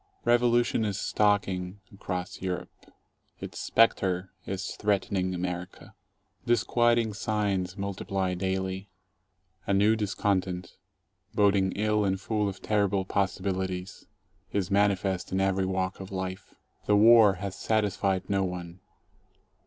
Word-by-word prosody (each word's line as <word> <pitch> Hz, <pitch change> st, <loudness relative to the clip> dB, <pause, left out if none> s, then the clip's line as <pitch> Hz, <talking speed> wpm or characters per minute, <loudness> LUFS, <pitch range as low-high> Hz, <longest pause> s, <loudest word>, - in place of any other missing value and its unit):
Revolution 120 Hz, -1 st, +3 dB
is 100 Hz, -2 st, -2 dB
stalking 100 Hz, -2 st, 0 dB
across 90 Hz, -2 st, -5 dB
Europe. 90 Hz, -1 st, -6 dB, 0.5 s
Its -, -, -7 dB
spectre 95 Hz, -5 st, +2 dB, 0.2 s
is 95 Hz, 0 st, -4 dB
threatening 95 Hz, -3 st, 0 dB
America. 90 Hz, 0 st, -5 dB, 0.5 s
Disquieting 120 Hz, -1 st, +2 dB
signs 100 Hz, -3 st, -1 dB
multiply 100 Hz, -1 st, -2 dB
daily. 95 Hz, +1 st, -2 dB, 0.8 s
A 100 Hz, -, +2 dB
new 105 Hz, +3 st, +4 dB
discontent, 95 Hz, -4 st, -1 dB, 0.6 s
boding 100 Hz, -2 st, +3 dB
ill 105 Hz, 0 st, +1 dB
and 95 Hz, -1 st, 0 dB
full 105 Hz, +2 st, -1 dB
of 95 Hz, -1 st, -9 dB
terrible 100 Hz, -2 st, +1 dB
possibilities, 95 Hz, -1 st, -2 dB, 0.4 s
is 100 Hz, -1 st, -1 dB
manifest 100 Hz, -2 st, +1 dB
in 95 Hz, -, 0 dB
every 95 Hz, -1 st, +1 dB
walk 95 Hz, 0 st, -2 dB
of 95 Hz, 0 st, -8 dB
life. 95 Hz, 0 st, -5 dB, 0.3 s
The 105 Hz, -, +4 dB
war 110 Hz, -1 st, +7 dB
has 95 Hz, +1 st, -5 dB
satisfied 100 Hz, -3 st, 0 dB
no 100 Hz, -1 st, +1 dB
one. 90 Hz, -1 st, -5 dB
95 Hz, 115 wpm, -28 LUFS, 95-105 Hz, 0.8 s, war